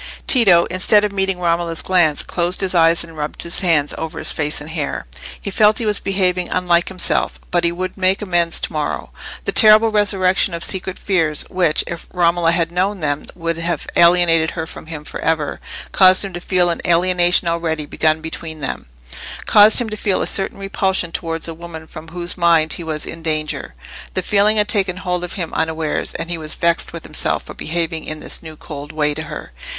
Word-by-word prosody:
Tito, 195 -10 +5
instead 205 +3 +3
of 210 - -2
meeting 195 -1 -1
Romola's 170 -1 -1
glance, 175 -5 +2
closed 175 +2 -2
his 190 -1 0
eyes 165 -1 +4
and 165 -1 -12
rubbed 150 -1 -1
his 170 - -1
hands 165 -6 +1
over 160 -1 -5
his - - +1
face 150 0 -2
and 150 +2 -9
hair. 155 -3 -3 0.3
He 200 - -6
felt 210 +2 +4
he 230 - -2
was 210 -1 +3
behaving 185 -2 -1
unlike 175 -1 +1
himself, 185 -2 +1
but 175 -1 +1
he 170 - +2
would 185 +2 -4
make 190 0 +1
amends 175 -4 0
to - - -4
morrow. 145 - -3 0.3
The - - 0
terrible 215 +1 +6
resurrection 190 -3 +1
of 170 - -1
secret 190 -1 0
fears, 165 -6 0
which, 175 -4 +2
if 170 -1 -7
Romola 170 -1 +2
had 170 -1 0
known 185 +2 -1
them, 145 -1 -1
would 165 -1 -3
have 170 +1 -2
alienated 170 -2 +4
her 160 - -2
from 160 - -11
him 155 -2 -7
for - - -8
ever, 155 -2 -1 0.3
caused 185 +1 +5
him 195 - -7
to 175 - -6
feel 180 -1 +1
an 170 - -4
alienation 175 0 +3
already 165 -2 -1
begun 155 +1 0
between 160 0 -6
them—caused 100 - +2
him 240 -2 -1
to - - -3
feel 200 -2 0
a - - -1
certain 195 0 -1
repulsion 190 -3 -1
towards 165 -1 -3
a 165 - -5
woman 160 -1 -9
from 160 0 -11
whose 175 +1 -6
mind 170 -3 +3
he 170 - -6
was 155 -2 -3
in 165 - -8
danger. 155 - -3 0.4
The 185 - -1
feeling 210 +3 +2
had 210 0 +2
taken 190 -4 0
hold 180 -1 -2
of 180 - -6
him 170 -4 -5
unawares, 160 -1 -2
and 170 - -4
he 170 - -2
was 155 -1 -4
vexed 170 0 0
with - - -8
himself - - -1
for - - -10
behaving 165 0 -3
in 155 0 -5
this - - -4
new 160 -1 -10
cold 145 -1 -9
way 150 -1 0
to 155 - -5
her. 150 - -8
170 Hz, 205 wpm, -18 LUFS, 160-185 Hz, 0.4 s, terrible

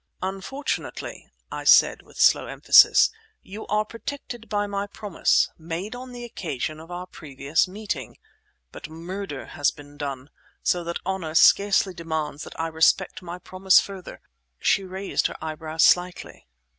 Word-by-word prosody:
"Unfortunately," 195 +10 -4 0.2
I - - -5
said, - - +6
with - - -19
slow - - +5
emphasis, - - +6 0.3
"you 205 +3 -9
are 210 0 +1
protected 230 +1 -7
by 205 -1 0
my 200 0 -3
promise, 205 -2 +1
made 170 +6 -5
on 250 +1 -9
the 245 -1 -8
occasion 155 - -4
of 165 +1 -12
our 180 +1 -6
previous 150 -1 -1
meeting. 185 - -5 0.5
But - - -9
murder 170 -1 -6
has 145 - 0
been 145 0 -13
done, 140 -1 -5 0.3
so 175 -1 +1
that 170 0 -3
honour 180 -4 -3
scarcely 200 +2 +5
demands 160 -3 -4
that - - -11
I 165 - 0
respect 165 +3 +2
my 175 0 -7
promise 185 +1 +3
further—" 195 -2 -8 0.4
She 195 - +2
raised 190 +1 -1
her - - -9
eyebrows 160 0 -2
slightly. 180 - +1
180 Hz, 145 wpm, -24 LUFS, 160-200 Hz, 0.5 s, said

